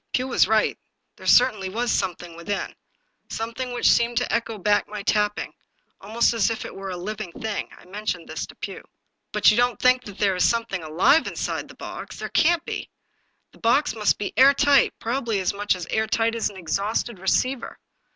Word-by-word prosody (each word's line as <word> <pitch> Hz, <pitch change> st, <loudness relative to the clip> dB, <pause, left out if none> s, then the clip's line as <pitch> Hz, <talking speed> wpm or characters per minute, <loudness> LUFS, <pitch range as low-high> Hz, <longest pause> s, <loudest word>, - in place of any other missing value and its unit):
Pugh 255 Hz, +1 st, 0 dB
was 260 Hz, -, +3 dB
right, 220 Hz, 0 st, +2 dB, 0.4 s
there -, -, -10 dB
certainly 215 Hz, -7 st, +4 dB
was 235 Hz, +5 st, -1 dB
something 175 Hz, -3 st, -2 dB
within; 195 Hz, +4 st, -4 dB, 0.6 s
something 230 Hz, +3 st, -4 dB
which 245 Hz, -, +1 dB
seemed 235 Hz, 0 st, +3 dB
to 245 Hz, -, 0 dB
echo 225 Hz, -1 st, -1 dB
back 205 Hz, +1 st, +1 dB
my 210 Hz, -1 st, -6 dB
tapping, 210 Hz, 0 st, 0 dB, 0.5 s
almost 225 Hz, +4 st, +1 dB
as 225 Hz, -3 st, +2 dB
if 225 Hz, -, -4 dB
it -, -, -8 dB
were 195 Hz, 0 st, -6 dB
a 180 Hz, -, -4 dB
living 185 Hz, -1 st, -5 dB
thing. 220 Hz, -2 st, -4 dB
I -, -, -17 dB
mentioned 185 Hz, -2 st, -4 dB
this -, -, -5 dB
to -, -, -14 dB
Pugh. -, -, -7 dB, 0.3 s
" -, -, -54 dB
But -, -, +5 dB
you 215 Hz, -, 0 dB
don't 245 Hz, -2 st, +2 dB
think 250 Hz, 0 st, +4 dB
that 205 Hz, -1 st, -10 dB
there 195 Hz, -2 st, +2 dB
is 180 Hz, -, +3 dB
something 230 Hz, -5 st, -1 dB
alive 165 Hz, -, +3 dB
in -, -, -6 dB
side -, -, -3 dB
the -, -, -14 dB
box? -, -, -8 dB
There -, -, -5 dB
can't 340 Hz, +1 st, +2 dB
be. -, -, -5 dB, 0.6 s
The -, -, -20 dB
box 265 Hz, +4 st, +2 dB
must 210 Hz, -2 st, +1 dB
be 205 Hz, -, -4 dB
air 275 Hz, +2 st, +7 dB
tight, 280 Hz, -1 st, +4 dB
probably 230 Hz, -3 st, -1 dB
as 185 Hz, -, 0 dB
much 205 Hz, -1 st, 0 dB
air 220 Hz, 0 st, +1 dB
tight 225 Hz, +1 st, +1 dB
as 230 Hz, -2 st, -1 dB
an 200 Hz, -, -12 dB
exhausted 200 Hz, +5 st, -2 dB
receiver." 255 Hz, +7 st, 0 dB
220 Hz, 200 wpm, -24 LUFS, 195-240 Hz, 0.6 s, air